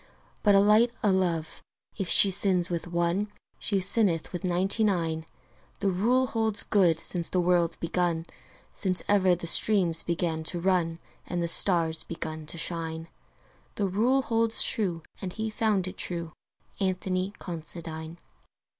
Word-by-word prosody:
But 205 -2 +4
a - - +6
light 210 +4 +5
o' 205 - +3
love, 170 -4 -1 0.3
if 195 -4 -3
she 195 - +6
sins 185 -2 +1
with 170 0 -3
one, 175 +4 -1 0.3
She 200 -3 0
sinneth 190 -4 0
with 175 - -5
ninety 185 +4 +2
nine: 165 -5 -1 0.5
The 200 -1 0
rule 240 +8 +2
holds 225 -3 0
good 175 -6 +2
since 170 -2 +1
the 185 - 0
world 175 -1 +1
begun 170 -1 -1 0.5
Since 185 -2 -1
ever 190 -3 +3
the 170 - -7
streams 175 -2 +4
began 165 -2 -2
to 175 - -1
run 170 -2 0 0.3
And 175 - -3
the 170 - -1
stars 165 -2 +3
began 160 -2 -6
to 170 - +1
shine. 165 -1 -4 0.7
The 200 - -1
rule 240 +8 +1
holds 230 -1 +2
true, 175 -7 +1 0.2
and 185 -2 -5
he 220 0 -4
found 215 -4 0
it 185 - -8
true 170 -2 -5 0.5
Anthony 185 0 -2
Considine. 165 -1 -6
180 Hz, 150 wpm, -27 LUFS, 170-200 Hz, 0.7 s, a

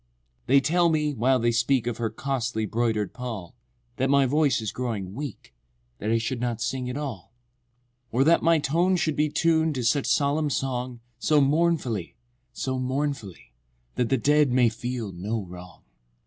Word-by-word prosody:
IV. - - -43
They 135 +2 +5
tell 170 +5 +3
me 150 -2 +1
(while 130 +2 +2
they 120 -1 +1
speak 120 +2 +1
Of 120 -2 -2
her 115 -2 -1
"costly 115 -2 -2
broider'd 110 -3 -1
pall") 115 -9 -6 0.4
That 130 +1 +1
my 140 -1 +4
voice 145 +1 +2
is 110 -2 -3
growing 110 -7 -4
weak— 140 -2 -7 0.5
That 105 - -3
I 115 - +3
should 115 +2 -3
not 120 -2 -2
sing 125 +1 -2
at 125 - -4
all— 130 - -6 0.8
V. 115 - -4
Or 135 - +5
that 165 +4 +4
my 165 0 +4
tone 170 +6 +2
should 160 -4 0
be 150 +1 +1
Tun'd 160 -1 +2
to 125 - -2
such 135 +5 +1
solemn 145 +1 +1
song 125 -3 -3 0.2
So 150 +3 +3
mournfully—so 130 - -1
mournfully, 130 - -3 0.4
That 120 -2 -1
the 135 - +3
dead 145 +2 +3
may 125 -2 +4
feel 120 -2 -5
no 100 +5 -3
wrong. 90 0 -12
125 Hz, 175 wpm, -25 LUFS, 115-145 Hz, 0.8 s, They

